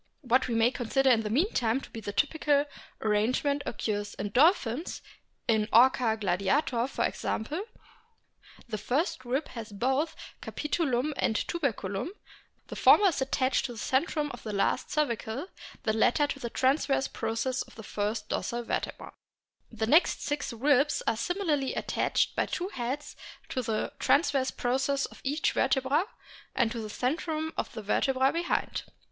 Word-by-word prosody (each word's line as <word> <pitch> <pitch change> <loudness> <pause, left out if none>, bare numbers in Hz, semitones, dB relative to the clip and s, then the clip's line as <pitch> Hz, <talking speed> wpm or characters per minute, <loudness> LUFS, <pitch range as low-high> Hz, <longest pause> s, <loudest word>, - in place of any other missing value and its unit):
What 255 -1 +2
we 235 - -1
may 225 +2 +4
consider 260 +2 +2
in 230 - +5
the 215 - -3
meantime 255 - +1
to - - -12
be 225 - -6
the 205 - -5
typical 290 +3 +2 0.4
arrangement 240 +7 +1
occurs 205 -1 -3
in 205 - -3
Dolphins; 275 - +2 0.4
in 220 -1 +2
Orca 240 -2 +5
gladiator, 215 - +1
for - - -1
example, 295 - -2 1.1
the 215 -3 -4
first 255 - -1
rib 260 +5 -2
has 230 -3 -8
both 265 +9 0 0.3
capitulum 300 -3 -1
and 220 - +1
tuberculum; 220 - -2 0.6
the - - -8
former 405 -2 +6
is 300 - -3
attached 265 0 +1
to 245 - -4
the - - -11
centrum 295 +5 0
of 240 - -9
the 215 - -5
last 195 - 0
cervical, 260 -1 -1 0.4
the 220 - +1
latter 240 +6 +3
to 280 -1 -4
the 235 - -4
transverse 270 +2 +1
process 255 +3 -2
of - - -9
the 220 - -9
first 210 +1 -2
dorsal 240 0 -2
vertebra. - - -4 0.6
The 225 -1 -2
next 310 +10 +4
six 290 -2 -2
ribs 280 +4 +2
are 230 - +2
similarly 305 - -1
attached - - 0
by - - +1
two 365 +2 -3
heads 265 0 -4 0.3
to 255 - -1
the 220 -2 -2
transverse 280 -3 +3
process 265 +3 0
of - - -12
each 290 +3 +1
vertebra 265 +5 +2 0.5
and 225 - +2
to 230 - -4
the 215 - -6
centrum 315 +6 -2
of - - -3
the 220 - -6
vertebra 265 +5 +2
behind. 340 +1 -1
260 Hz, 155 wpm, -29 LUFS, 225-290 Hz, 1.1 s, former